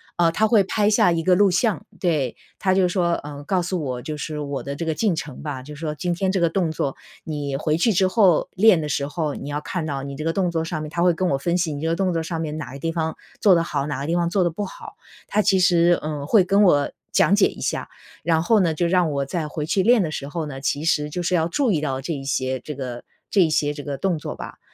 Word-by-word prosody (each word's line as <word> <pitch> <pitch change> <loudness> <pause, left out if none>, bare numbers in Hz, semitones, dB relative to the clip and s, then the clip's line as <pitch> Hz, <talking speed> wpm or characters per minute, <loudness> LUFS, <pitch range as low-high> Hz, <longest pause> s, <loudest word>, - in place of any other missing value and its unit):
呃， 170 -1 +3
他 215 +6 +2
会 215 -2 +4
拍 205 +2 +1
下 190 -4 +4
一 165 -1 0
个 185 - +4
录 200 +2 +5
像。 210 +3 0
对， 155 - 0 0.2
他 190 - +1
就 185 -1 +3
说， 175 -2 +1
呃， 145 0 -8
告 185 +2 +1
诉 180 0 -2
我 125 -3 -3
就 155 - -4
是 150 +1 -5
我 140 -2 -4
的 140 0 -5
这 165 - -4
个 160 - 0
进 200 +2 +1
程 150 -4 -6
吧。 145 -4 -5
就 150 +3 -9
说 150 0 -4
今 175 +3 -1
天 185 +2 0
这 190 - 0
个 170 -2 +2
动 175 -3 0
作， 140 -3 -2 0.3
你 145 -3 -3
回 155 +1 0
去 225 +7 +3
之 190 -1 +3
后 185 -4 +3
练 200 -2 +5
的 150 - -3
时 140 0 -1
候， 150 -1 -2
你 140 - -7
要 145 - -2
看 170 +3 -4
到 140 -2 -3
你 140 0 -6
这 155 - -5
个 165 - +1
动 180 0 0
作 165 -1 -1
上 165 -1 -3
面， 155 - -5
他 170 - -2
会 175 0 +4
跟 185 +2 0
我 - - +2
分 170 +5 0
析 170 -4 -1
你 145 - -5
这 160 - -1
个 165 - +1
动 185 0 0
作 165 - 0
上 165 0 -4
面 155 -2 -3
哪 130 -4 -6
个 - - -7
地 165 +3 -2
方 160 -1 -2 0.2
做 195 -4 +6
得 170 - +2
好， 145 -3 -2
哪 140 -2 -3
个 - - -3
地 165 +3 0
方 170 -1 +1
做 185 +1 +2
的 175 - +1
不 190 +6 -4
好。 195 - -9 0.3
他 210 - +2
其 195 -2 +3
实， 175 -1 +4
呃， 150 -2 -3
会 200 +3 +5
跟 195 +3 +3
我 145 -8 +4 0.2
讲 - - +3
解 - - +5
一 - - -9
下， - - -2 0.3
然 160 -1 +1
后 220 +4 +4
呢， 170 -5 +1
就 175 - 0
让 175 -1 +2
我 140 -1 -1
再 155 +2 -3
回 150 0 -4
去 175 +5 +1
练 230 +1 +4
的 155 - -3
时 140 - -5
候 160 +2 -4
呢， 135 -2 -7
其 145 +2 -1
实 150 -2 +1
就 175 +4 -4
是 185 - -1
要 165 -2 +2
注 245 +8 +1
意 160 -6 +1
到 135 -3 -2
这 165 +5 -3
一 140 -2 -5
些 130 -1 -1
这 150 - -7
个 125 -3 -6 0.3
这 200 - +4
一 165 - +4
些 150 -1 +1
这 145 - -7
个 140 -1 -4
动 180 -2 0
作 - - -6
吧。 - - -9
165 Hz, 310 characters per minute, -23 LUFS, 145-180 Hz, 0.3 s, 做